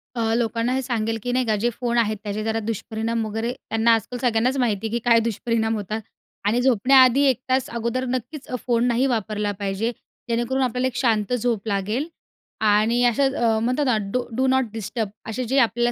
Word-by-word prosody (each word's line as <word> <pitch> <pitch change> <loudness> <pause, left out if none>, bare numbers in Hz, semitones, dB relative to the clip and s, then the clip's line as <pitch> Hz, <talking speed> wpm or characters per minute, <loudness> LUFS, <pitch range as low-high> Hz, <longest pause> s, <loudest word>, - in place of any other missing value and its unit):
अ, 225 -1 0
लोकांना 235 +1 0
हे 265 - 0
सांगेल 225 -3 -1
की 245 - -2
नाही 255 0 +1
का, 220 -2 +1
जे 235 +4 +1
फोन 240 0 -2
आहेत 215 -2 +1
त्याचे 210 +1 -3
जरा 225 0 -1
दुष्परिणाम 225 +1 -3
वगैरे 225 +3 -2
त्यांना 225 -2 0
आजकाल 230 +2 -2
सगळ्यांनाच 245 +2 +1
माहिती 225 -4 0
आहे, - - -7
की 235 - 0
काय 230 -1 +6
दुष्परिणाम 225 0 -1
होतात 215 +1 -4 0.5
आणि 235 +4 +2
झोपण्याआधी 260 +2 +5
एक 260 - +1
तास 260 0 +1
अगोदर 235 +2 -2
नक्कीच 255 +4 -4 0.2
फोन 235 -1 +2
नाही 245 +2 +2
वापरला 210 -3 -1
पाहिजे, 200 +3 -1 0.4
जेणेकरून 240 +3 0
आपल्याला 250 +1 0
एक 260 - -6
शांत 225 -3 +1
झोप 230 -3 -1
लागेल 210 +8 -1 0.6
आणि 220 +4 +3
असं 270 +3 +2
अ, 225 -2 +2
म्हणतात 255 +6 0
ना, 250 -4 +2
डू 250 +2 0
डू 260 +1 +2
नॉट 260 0 +3
डिस्टर्ब 225 0 -3 0.2
असे 250 +3 -3
जे 260 +4 0
आपल्याला 240 0 +2
235 Hz, 190 wpm, -23 LUFS, 220-250 Hz, 0.6 s, काय